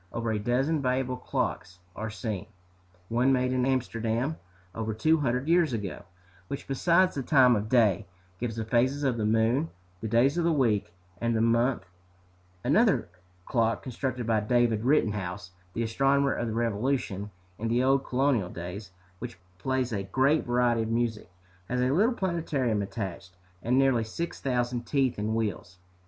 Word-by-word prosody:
Over 115 -1 -2
a 105 - 0
dozen 135 +8 +1
valuable 130 0 0
clocks 95 -6 -3 0.2
are 110 +1 -4
seen, 105 -2 -4 0.6
one 120 +5 +2
made 125 -1 +2
in 130 0 +1
Amsterdam 125 +2 -1 0.4
over 110 -1 -3
two 155 +8 +3
hundred 130 0 0
years 170 -5 +3
ago, 105 -5 -4 0.4
which, 140 - -6
besides 170 +7 +3
the 140 - -3
time 130 -2 +5
of 105 +1 -2
day, 110 -5 +3 0.3
gives 115 -2 -3
the 110 -1 -3
phases 130 +5 +1
of 130 -4 +1
the 105 -2 0
moon, 115 +8 +2 0.3
the 110 - -4
days 125 +9 +3
of - - +1
the 170 - +3
week, 115 - +1 0.3
and 115 0 0
the 110 - +1
month; 115 +3 +2 0.8
another, 155 - +4
a 100 - -17 0.4
clock 115 -2 +1
constructed 130 -1 -3
by 110 -1 +2
David 115 0 +1
Rittenhouse, 105 -9 0 0.2
the 115 - -1
astronomer 135 +4 +2
of 120 - -2
the 110 - -3
Revolution, 115 -2 -1 0.3
in 115 - -2
the 120 +2 +2
old 135 +1 +3
colonial 125 -7 +1
days, 90 +4 -7 0.3
which - - -7 0.2
plays 130 +2 -1
a 100 - -1
great 130 +11 +1
variety 120 -1 +2
of 110 - -2
music, 115 -3 -1 0.4
has 125 - 0
a 125 +1 +2
little 215 - +3
planetarium 155 - 0
attached, 95 -3 -6 0.2
and 125 +6 +1
nearly 135 -4 +3
six 165 +10 -5
thousand 120 -2 -1
teeth 135 -4 +1
in 110 +2 -1
wheels. 100 -5 -3
120 Hz, 165 wpm, -28 LUFS, 110-135 Hz, 0.8 s, time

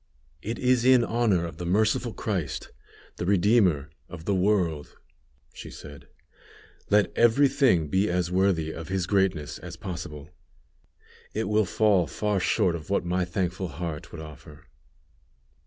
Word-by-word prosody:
"It 115 +6 -4
is 125 -1 +2
in 130 -1 +5
honor 110 -7 +1
of 85 - -8
the 90 - -4
Merciful 110 +5 +1
Christ 95 -8 -3 0.5
the - - -3
Redeemer 95 -7 +3 0.2
of 85 -2 -10
the 100 - +1
world," 90 -6 0 0.6
she - - -9
said; 70 -1 -12 0.8
"let 105 0 +2
every 120 +5 +5
thing 130 - +2
be 95 +7 +1
as 90 0 -1
worthy 90 -4 +1
of 80 0 -8
His 95 -2 -1
greatness 95 -6 0
as 85 -1 -9
possible; 80 -4 -7 1.0
it 110 0 -1
will 105 +1 +2
fall 100 -3 +2
far 105 +5 -1
short 95 -1 +1
of 80 0 -8
what 100 - 0
my 90 +1 0
thankful 90 +1 -2
heart 80 0 -6
would 85 - -8
offer." 75 -1 -12
95 Hz, 145 wpm, -26 LUFS, 85-105 Hz, 1.0 s, in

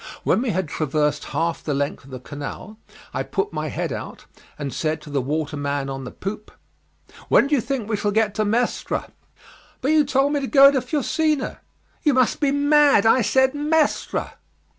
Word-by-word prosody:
When - - +2
we 255 - -1
had 185 -4 -1
traversed 150 -1 -1
half 165 +1 -2
the 145 - -2
length 140 -1 -3
of - - -15
the 130 -1 -7
canal 145 - -8 0.3
I - - -1
put 415 +1 -3
my - - -3
head - - -3
out, - - -8 0.3
and 140 -3 -5
said 155 0 -1
to 150 - -11
the 140 -1 0
waterman 145 -1 -2
on 135 -1 -6
the - - -7
poop, 210 +2 -6 0.8
"When - - +5
do 285 - -2
you 275 - +3
think 250 -2 -3
we 220 - 0
shall 205 - -1
get 210 0 +1
to 215 - 0
Mestre?" 230 +4 -1 0.7
"But 275 - 0
you 310 -1 +5
told 275 +1 +1
me 290 - +1
to 270 - -3
go 275 0 +7
to 265 -2 0
Fusina." 305 0 -1 0.4
"You 295 -4 +2
must 255 -2 +2
be 290 - +2
mad; 285 -5 +4
I 235 +3 +5
said 265 +5 +3
Mestre." 300 +1 0
220 Hz, 190 wpm, -22 LUFS, -, 0.8 s, go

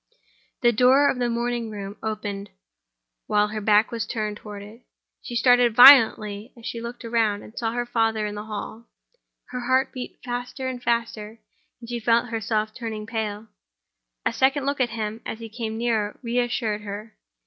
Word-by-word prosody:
The 240 -2 +5
door 260 +5 +5
of 250 - -5
the 245 -1 +1
morning 235 -1 -2
room 200 -1 -7
opened 205 -2 -4 0.8
while 210 0 +2
her 215 0 -4
back 210 +1 +4
was 230 -3 -3
turned 215 -2 -3
toward 205 -2 -9
it. 215 +4 -13 0.4
She 240 - -7
started 245 -1 +4
violently, 225 -4 +7
as 230 - -13
she 230 - -4
looked 235 +1 -7
round 225 -3 0
and 220 - -14
saw 225 -1 -2
her 240 0 -1
father 225 -2 0
in 210 - -4
the 210 +1 -6
hall: 220 +2 -7 0.6
her 250 - -4
heart 260 +2 +1
beat 255 -1 -7
faster 245 +2 -4
and 255 -1 -4
faster, 230 -2 -2 0.4
and 235 - -11
she 240 0 -3
felt 230 +1 +2
herself 215 -1 -1
turning 220 -3 -5
pale. 220 -1 -4 0.8
A - - +1
second 270 +1 +2
look 280 -1 -1
at 245 - +2
him, 220 -1 -4
as - - -5
he 225 0 -9
came 220 -1 -5
nearer, 225 -3 -1
re 240 +1 0
assured 230 -3 -1
her. 210 +2 -7
230 Hz, 180 wpm, -24 LUFS, 215-245 Hz, 0.8 s, violently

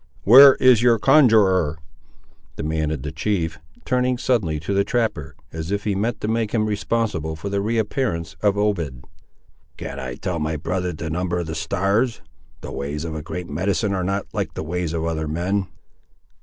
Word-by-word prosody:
"Where 135 +5 +9
is 125 -3 +5
your 120 -1 +4
conjuror?" 100 - +4 0.8
demanded 75 -2 -2
the 75 - -4
chief, 80 -1 -2 0.3
turning 125 0 +1
suddenly 100 -12 0
to 100 - -3
the 100 0 +3
trapper, 100 - -2 0.2
as 80 +1 -5
if 100 +1 -2
he 105 - 0
meant 110 +4 -2
to - - -2
make 110 -1 -1
him 110 -1 +2
responsible 105 -6 -1
for 90 +6 -6
the 100 0 -1
re 115 +3 -1
appearance 100 - -2
of 100 -1 +2
Obed. 85 -12 -1 0.7
"Can 70 - -6
I 65 -2 -5
tell 90 +2 -3
my 80 +1 -2
brother 90 +4 -2
the 80 -1 -6
number 90 +1 -1
of 85 - -2
the 80 - -5
stars? 100 +8 0 0.4
The - - -7
ways 75 +3 -4
of 80 - -4
a 80 - -4
great 85 +2 -6
medicine 100 +6 -1
are 95 -1 -1
not 100 +2 -1
like - - -3
the - - -4
ways 85 0 -3
of 80 -1 -2
other 80 -1 -2
men." 90 +5 -1
90 Hz, 185 wpm, -22 LUFS, 80-105 Hz, 0.8 s, Where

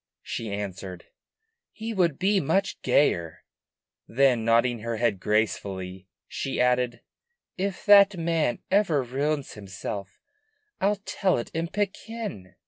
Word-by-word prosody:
she 115 -3 -4
answered, 95 -3 -6 0.7
"he 225 +1 -5
would 170 -8 +1
be 195 +1 +2
much 190 +6 0
gayer." 85 - +1 0.6
Then, 125 -1 +3
nodding 115 +1 +3
her 115 +1 -3
head 115 -4 +1
gracefully, 95 -3 -2 0.2
she 135 - -3
added, 125 -1 +1 0.5
"If 190 0 -3
that 200 -2 +7
man 165 -6 0
ever 185 -9 +3
ruins 140 +3 -2
himself 100 -1 -7 0.6
I'll 205 +1 +1
tell 190 -3 +1
it 120 - -5
in 165 +1 -1
Pekin! 205 - -4
125 Hz, 120 wpm, -26 LUFS, -, 0.7 s, that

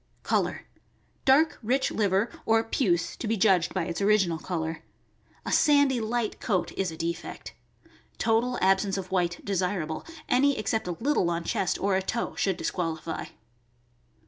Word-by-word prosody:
Color. - - 0 0.3
— - - -39
Dark, 290 +4 +4
rich 255 +4 +1
liver, 200 +1 +1 0.2
or 225 0 +4
puce 180 -7 0
(to 230 - -4
be 225 +1 0
judged 185 -4 +3
by 185 - -1
its 170 0 -4
original 195 -5 +3
color). 160 -2 -3 0.6
A - - -3
sandy, 285 -4 +4
light 225 0 -2
coat 185 -5 -1
is 190 -2 -2
a 160 - -8
defect. 170 +1 -5 0.6
Total 235 +2 +1
ab 190 0 +5
sence 195 -1 -2
of 185 -1 -6
white 175 -2 -1
desirable; 180 -5 -1 0.2
any 275 +2 +3
except 220 -1 -1
a 175 - -1
little 260 -9 +1
on 170 0 -2
chest 180 0 0
or 195 -1 +1
a 190 - +2
toe 225 +5 -2
should 190 -3 0
disqualify. 165 -3 -3
195 Hz, 160 wpm, -27 LUFS, 175-225 Hz, 0.6 s, ab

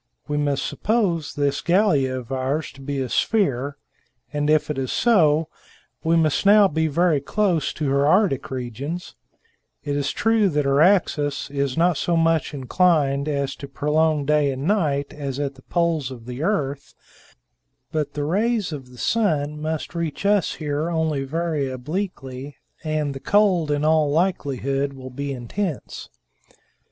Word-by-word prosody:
We 150 - -2
must 145 -2 0
suppose 190 -9 0
this 145 -1 0
Gallia 170 -9 +2
of 125 0 -8
ours 135 +4 -1
to 135 - -15
be 140 0 -3
a 130 - -2
sphere, 140 - 0 0.6
and 145 0 0
if 155 0 +2
it 140 - -3
is 130 -1 -2
so, 160 -9 +3 0.6
we 165 +1 +2
must 155 -3 +2
now 205 0 +7
be 160 -1 0
very 160 -1 +2
close 170 0 0
to 150 - -3
her 140 +1 +3
Arctic 185 -5 +2
regions; 130 +7 -5 0.7
it 145 -2 -2
is 140 -1 0
true 225 -2 +2
that 150 -3 0
her 140 +1 +3
axis 150 -7 +2
is 140 -1 -1
not 170 -1 +3
so 170 +3 0
much 165 -1 +2
inclined 145 0 +1
as 140 -2 -1
to 140 - -8
prolong 150 +1 +1
day 150 -1 +2
and 135 +1 -5
night 150 -7 0
as 140 -2 -5
at 140 -1 -2
the 130 - -17
poles 165 -3 0
of 120 -3 -10
the 125 +2 -6
earth, 145 -7 -2 1.0
but 150 -2 -2
the 145 - -2
rays 205 +3 0
of 135 -4 -8
the 125 - -15
sun 150 - 0
must 155 +1 -3
reach 170 +1 -4
us 205 -2 +2
here 150 +1 -2
only 160 -4 0
very 155 -1 -2
obliquely, 135 -1 -5 0.3
and 155 -2 -1
the 135 - -7
cold, 190 -4 +2
in 145 0 0
all 155 -1 +3
likelihood, 140 -5 0
will 130 -1 -9
be 140 +2 -4
intense." 140 - -4
150 Hz, 160 wpm, -23 LUFS, 140-170 Hz, 1.0 s, now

